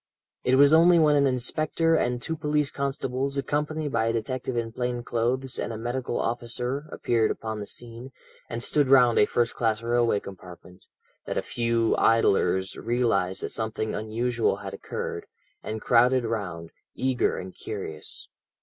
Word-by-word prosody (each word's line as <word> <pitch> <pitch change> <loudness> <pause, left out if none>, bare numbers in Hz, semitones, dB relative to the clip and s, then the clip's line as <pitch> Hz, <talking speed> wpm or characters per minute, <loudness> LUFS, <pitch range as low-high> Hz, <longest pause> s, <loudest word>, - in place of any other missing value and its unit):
It 125 - +3
was 140 +2 +6
only 170 +2 +7
when 155 -2 +5
an 140 -1 +4
inspector 155 +6 +1
and 125 -5 0
two 160 +6 -3
police 150 -1 0
constables, 140 -1 -2
accompanied 150 +2 -2
by 115 -2 +1
a 115 - +1
detective 125 +2 -3
in 115 -1 -2
plain 125 0 -3
clothes 125 +3 -1
and - - -2
a 110 - -5
medical 120 +2 -3
officer, 125 +5 -3
appeared 115 -2 +1
upon 110 -1 -4
the 105 - -6
scene, 120 +2 -8 0.4
and 115 0 -4
stood 145 0 +2
round 125 -3 +5
a 105 - +5
first 120 -1 0
class 115 -1 0
railway 120 -2 +2
compartment, 90 -1 -12 0.4
that - - -3
a - - 0
few 115 -1 +1
idlers 95 -4 +2
realized 115 -6 0
that - - -2
something 110 -1 -3
unusual 115 +2 0
had 100 -1 -8
occurred, 100 - -5 0.3
and 110 0 -5
crowded 125 +1 +4
round, 90 -7 -4 0.2
eager 130 -1 0
and 95 0 -7
curious. 95 -8 -6
120 Hz, 160 wpm, -26 LUFS, 110-130 Hz, 0.4 s, only